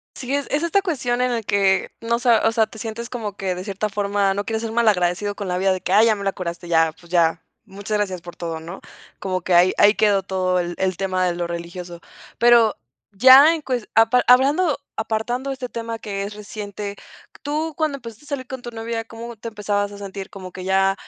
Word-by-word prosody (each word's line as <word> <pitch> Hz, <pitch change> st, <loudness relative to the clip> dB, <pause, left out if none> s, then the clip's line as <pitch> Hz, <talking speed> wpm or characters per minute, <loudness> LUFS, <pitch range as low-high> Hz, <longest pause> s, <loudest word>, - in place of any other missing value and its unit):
Sí, 265 Hz, +1 st, -4 dB
es 285 Hz, -1 st, -1 dB
es 295 Hz, +3 st, 0 dB
esta 390 Hz, +4 st, +2 dB
cuestión 250 Hz, -9 st, -1 dB
en 250 Hz, 0 st, +2 dB
el 230 Hz, -3 st, -2 dB
que, 195 Hz, -1 st, +2 dB
no 235 Hz, +1 st, 0 dB
sa 240 Hz, -3 st, +3 dB
o 225 Hz, -, +3 dB
sea, 225 Hz, -2 st, +2 dB
te 220 Hz, -, -13 dB
sientes 230 Hz, +1 st, -5 dB
como 215 Hz, -5 st, -5 dB
que 190 Hz, -2 st, -2 dB
de 180 Hz, +1 st, -6 dB
cierta 205 Hz, +1 st, -2 dB
forma 200 Hz, -1 st, 0 dB
no 205 Hz, +1 st, -2 dB
quieres 225 Hz, +1 st, -3 dB
ser 225 Hz, -1 st, -4 dB
malagradecido 205 Hz, -3 st, +1 dB
con 200 Hz, -2 st, -5 dB
la 180 Hz, -, -1 dB
vida 190 Hz, 0 st, +2 dB
de 185 Hz, -, -2 dB
que: 185 Hz, -, -3 dB
"Ay, 215 Hz, +3 st, +6 dB
ya 220 Hz, -, +4 dB
me 200 Hz, -, -6 dB
la 195 Hz, -, +1 dB
curaste, 170 Hz, -1 st, -6 dB
ya, 160 Hz, -1 st, +3 dB
pues 170 Hz, -1 st, -18 dB
ya, 165 Hz, -1 st, +2 dB, 0.2 s
muchas 205 Hz, +1 st, -4 dB
gracias 190 Hz, -4 st, -2 dB
por 175 Hz, 0 st, -10 dB
todo", 165 Hz, -2 st, -5 dB
¿no?, 170 Hz, +4 st, -9 dB, 0.4 s
como 185 Hz, -1 st, -2 dB
que 180 Hz, -, 0 dB
ahí 180 Hz, +2 st, +6 dB
ahí 205 Hz, +1 st, +6 dB
quedó 205 Hz, -3 st, +3 dB
todo 185 Hz, -1 st, 0 dB
el 175 Hz, 0 st, -2 dB
el 185 Hz, -2 st, 0 dB
tema 185 Hz, -1 st, 0 dB
de 175 Hz, -, 0 dB
lo 175 Hz, -1 st, -2 dB
religioso, 170 Hz, 0 st, -7 dB, 0.4 s
pero 235 Hz, -2 st, +5 dB, 0.4 s
ya 260 Hz, +9 st, +8 dB
en 320 Hz, -, -4 dB
cues 250 Hz, -5 st, -3 dB
apa 225 Hz, +3 st, +5 dB
hablando, 280 Hz, +6 st, +4 dB, 0.2 s
apartando 235 Hz, +4 st, -2 dB
este 255 Hz, -2 st, -5 dB
tema 230 Hz, -1 st, -5 dB
que 200 Hz, -2 st, -4 dB
es 205 Hz, +1 st, -5 dB
reciente, 205 Hz, -1 st, -7 dB, 0.5 s
tú 305 Hz, +1 st, -2 dB
cuando 310 Hz, -3 st, 0 dB
empezaste 230 Hz, +1 st, -11 dB
a -, -, -15 dB
salir 275 Hz, -3 st, -4 dB
con 260 Hz, -1 st, -7 dB
tu 240 Hz, -, -6 dB
novia, 225 Hz, 0 st, -4 dB
¿cómo 230 Hz, +1 st, -9 dB
te 230 Hz, +2 st, -7 dB
empezabas 205 Hz, -1 st, -2 dB
a 200 Hz, -, -10 dB
sentir 195 Hz, 0 st, -7 dB
como 185 Hz, -2 st, -9 dB
que 185 Hz, -, -8 dB
ya, 195 Hz, +1 st, +2 dB
210 Hz, 230 wpm, -22 LUFS, 190-235 Hz, 0.5 s, ya